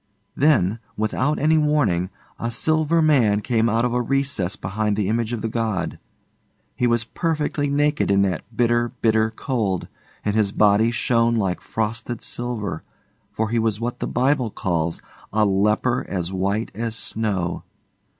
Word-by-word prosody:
Then, 115 - +3 0.2
without 130 +7 0
any 155 +2 +3
warning, 135 - +1 0.3
a 115 - -2
Silver 155 +6 +2
Man 120 -10 +4
came 115 -1 +1
out 115 +2 +2
of 120 - 0
a 125 - +1
recess 130 -7 0
behind 105 +2 -1
the 105 -2 0
image 115 +1 0
of 115 -3 -3
the - - 0
god. 110 -6 -2 0.8
He 125 - +1
was 120 -1 +2
perfectly 150 0 -1
naked 145 +1 +1
in 100 0 +4
that 95 -4 0 0.2
bitter, 120 0 +2
bitter 110 -1 +3
cold, 110 -6 -2 0.4
and 105 0 0
his 105 -3 +2
body 105 +2 +4
shone 115 0 +2
like 95 -5 -1
frosted 110 +1 -3
silver, 110 -9 -3 0.5
for 110 0 -1
he 120 - +2
was 110 -2 0
what 120 +1 -3
the - - -2
Bible 130 -1 +1
calls 85 -5 -2 0.3
'a 110 +1 +3
leper 105 +5 +2
as 90 -1 -3
white 100 +4 -1
as 115 +1 -3
snow. 100 -7 -2
115 Hz, 155 wpm, -22 LUFS, 105-125 Hz, 0.8 s, Man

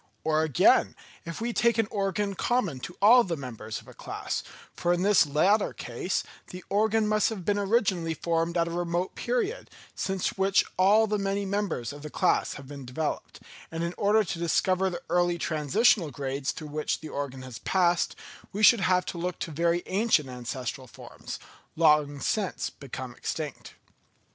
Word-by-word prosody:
Or 155 0 +2
again, 155 -6 +4 0.3
if 165 -1 -6
we 235 +1 -2
take 235 0 +2
an 225 -2 +2
organ 200 0 -1
common 195 - 0
to 175 +7 -8
all 240 +4 +8
the 170 -5 -3
members 115 -5 -6
of - - -18
a - - -12
class, - - -4 0.3
for 175 - 0
in 175 +1 0
this 205 -6 +5
latter 190 +9 +2
case 125 +10 -3 0.2
the 180 0 -9
organ 215 +1 +2
must 215 0 +2
have 200 -6 -6
been 205 0 +1
originally 195 -6 +1
formed 165 +2 -1
at 170 0 +2
a - - -4
remote 175 +1 -2
period, 480 -1 -2 0.2
since 190 -1 -1
which 195 +1 +3
all 205 +4 +5
the 210 -1 -1
many 200 0 -1
members 190 - -2
of 145 - -10
the 150 - -7
class - - +1
have 135 -2 -10
been 140 -1 -8
developed; 130 +5 -4 0.3
and 165 +1 -4
in 170 +1 -2
order 215 +1 +3
to 170 -3 -5
discover 185 +3 +2
the 175 - -6
early 175 0 +2
transitional 165 - +2
grades 140 -1 -3
through 155 -2 -8
which 150 +1 -2
the 155 - -7
organ 135 -3 -5
has 130 -3 -8
passed, 175 -2 +1 0.4
we 210 +2 -3
should 225 0 +7
have 185 -1 +2
to 170 - -5
look 180 +1 -3
to 165 - -5
very 170 +3 +1
ancient 195 - +2
ancestral 125 +2 -5
forms, - - -9 0.4
long 150 -3 +3
since 200 +5 -1
become 130 -2 -8
extinct. 150 +2 -5
175 Hz, 175 wpm, -27 LUFS, 150-200 Hz, 0.4 s, all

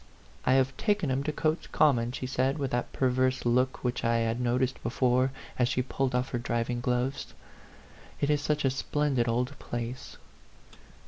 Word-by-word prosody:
"I 130 - +5
have 135 0 +2
taken 205 -9 +1
him 130 +1 +1
to 155 - 0
Cotes 155 +2 -1
Common," 120 -6 +3
she 130 - -5
said, 130 +2 0
with 140 -3 -2
that 120 0 -1
perverse 130 0 +1
look 125 +2 +1
which 125 -1 -1
I 115 -1 +2
had 115 +1 0
noticed 125 +2 0
before, 125 +2 +2 0.3
as 125 -1 +3
she 125 -1 0
pulled 130 0 -1
off 125 +1 0
her 120 - -2
driving 120 0 -1
gloves. 125 +3 -1 0.8
"It 145 - +1
is 145 -1 +2
such 150 -1 0
a 135 - +3
splendid 135 -2 0
old 125 +3 0
place." 120 +3 -5
130 Hz, 175 wpm, -29 LUFS, 120-135 Hz, 0.8 s, I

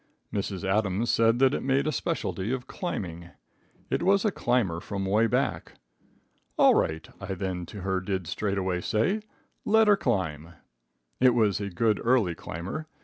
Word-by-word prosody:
Mrs. 100 -1 -3
Adams 105 +2 +1
said 115 +1 +3
that 135 +1 +4
it - - -1
made 135 +1 +1
a 155 - +1
specialty 110 -4 -2
of 130 -1 -3
climbing. 85 - -5 0.6
It - - +1
was 195 +2 +3
a 210 - +3
climber 120 - 0
from 100 +2 -4
away 105 +4 +3
back. - - -1 0.8
"All - - +6
right," 80 0 0
I 95 -1 -4
then 90 -2 -4
to 100 - -8
her 95 0 0
did 95 -1 -3
straightway 95 +1 -1
say, 120 - 0 0.4
"let 220 +1 +4
her 205 -1 +6
climb." 85 - -2 0.7
It 125 -1 +5
was 105 -4 +2
a 100 - -3
good 105 +4 +1
early 115 -7 +3
climber. 90 - -6
100 Hz, 160 wpm, -27 LUFS, 95-125 Hz, 0.8 s, All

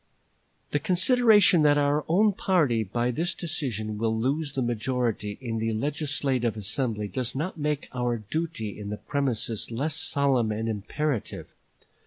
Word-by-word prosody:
"The 145 - +1
consideration 205 - +5
that 145 -1 +5
our 145 +1 +2
own 200 +5 +4
party 150 - +2
by 120 +5 -1
this 165 +7 -1
decision 115 - -3
will 110 0 0
lose 140 +5 -1
the 130 - 0
majority 120 -3 -1
in 115 -4 -3
the 115 0 -1
legislative 135 -2 -1
assembly 105 +1 -2
does 125 +5 -3
not 160 +4 -3
make 150 -1 -1
our 120 -1 0
duty 110 - -4
in 100 -1 -6
the 105 - -4
premises 125 -6 -2
less 140 +7 -2
solemn 140 -6 +1
and 110 +1 -2
imperative. 115 +5 -3
130 Hz, 145 wpm, -26 LUFS, 110-150 Hz, -, consideration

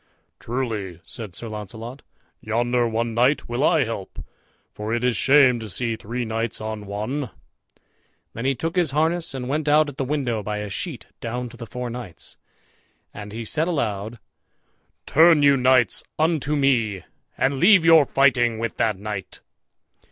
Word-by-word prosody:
"Truly," 110 -8 -4
said 105 -6 -7
Sir 120 - -5
Launcelot, 110 +4 -7 0.4
"yonder 120 +2 0
one 115 +1 -2
knight 125 +6 +2
will 120 +3 -2
I 160 -2 +4
help, 110 -5 -6 0.5
for 110 +2 -3
it 120 - -2
is 125 -2 +2
shame 135 -3 +5
to 110 -1 -7
see 115 +2 -1
three 120 +3 -4
knights 115 0 -2
on 110 -1 -5
one." 110 +7 -3 1.0
Then 115 - -5
he 135 0 +2
took 165 +7 -3
his 175 -4 +2
harness 165 -1 +1
and 125 -2 -4
went 150 +3 -2
out 150 0 +4
at 145 - -11
the 140 - -1
window 130 -5 -1
by 105 +1 -4
a 105 -1 -5
sheet 145 - -4
down 120 +1 -4
to 120 - -14
the 115 - -8
four 125 0 -5
knights; 115 -8 -9 0.8
and 105 0 -8
he 115 +2 -6
said 155 +9 0
aloud, 115 - -2 0.9
"Turn 160 -1 +5
you 140 -1 +6
knights 130 -2 +3
unto 155 -2 +1
me, 115 - +1 0.3
and 130 +1 +1
leave 185 -1 +6
your 165 -3 +7
fighting 125 -5 +3
with 115 0 -4
that 110 -4 +1
knight." 100 -1 -6
120 Hz, 165 wpm, -23 LUFS, 110-140 Hz, 1.0 s, your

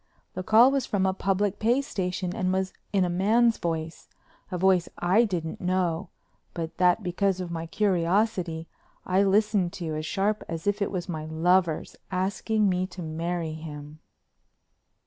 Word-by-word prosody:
The 185 - -4
call 225 +7 +6
was 275 -3 0
from 195 -2 +1
a 190 - +2
public 195 +1 0
pay 235 +4 +3
station 180 -6 -3
and 185 0 0
was 190 0 -1 0.2
in 195 -3 +2
a - - 0
man's 220 +6 +3
voice—a 165 +2 -6
voice 185 -1 +3
I 190 +7 +3
didn't 170 -6 -4
know, 180 -2 0 0.5
but 165 -2 -5
that, 180 +3 +3
because 185 +1 0
of 180 -2 -4
my 165 0 -4
curiosity, 180 -2 0 0.4
I 185 +1 +2
listened 200 -2 +2
to 170 -5 -4
as 155 0 -3
sharp 205 +4 0
as 165 -1 -5
if 205 +1 0
it 200 - +1
was 180 -3 -4
my 155 -4 -4
lover's 170 +1 +1
asking 200 +3 0
me 185 0 0
to 180 -1 -8
marry 165 +1 -3
him. 150 -1 -9
185 Hz, 160 wpm, -26 LUFS, 170-200 Hz, 0.5 s, call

